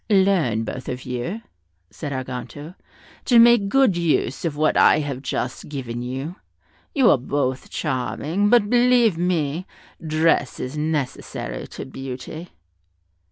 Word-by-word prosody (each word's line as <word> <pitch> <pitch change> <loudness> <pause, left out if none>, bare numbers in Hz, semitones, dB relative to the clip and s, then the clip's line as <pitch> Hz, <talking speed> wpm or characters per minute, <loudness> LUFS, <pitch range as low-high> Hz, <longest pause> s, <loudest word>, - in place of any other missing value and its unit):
"Learn, 190 - +3
both 125 +2 -6
of 125 0 -5
you," 130 - -4 0.5
said 150 -3 -6
Arganto, 130 +4 -6 0.5
"to 245 - +4
make 230 -3 +6
good 265 -5 +4
use 165 -6 0
of 150 -3 -2
what 155 +1 +2
I - - +6
have 140 -4 -3
just 130 -1 -4
given 125 -5 -5
you; 135 +8 -5 0.6
you 265 -5 +5
are 140 - +3
both 130 0 -2
charming, 155 +9 -1
but 235 -3 +5
believe 240 -3 +4
me, 170 -1 -1 0.4
dress 155 -4 +1
is 130 +3 -5
necessary 150 - -3
to - - -8
beauty." 135 +6 -7
150 Hz, 130 wpm, -22 LUFS, 130-190 Hz, 0.6 s, make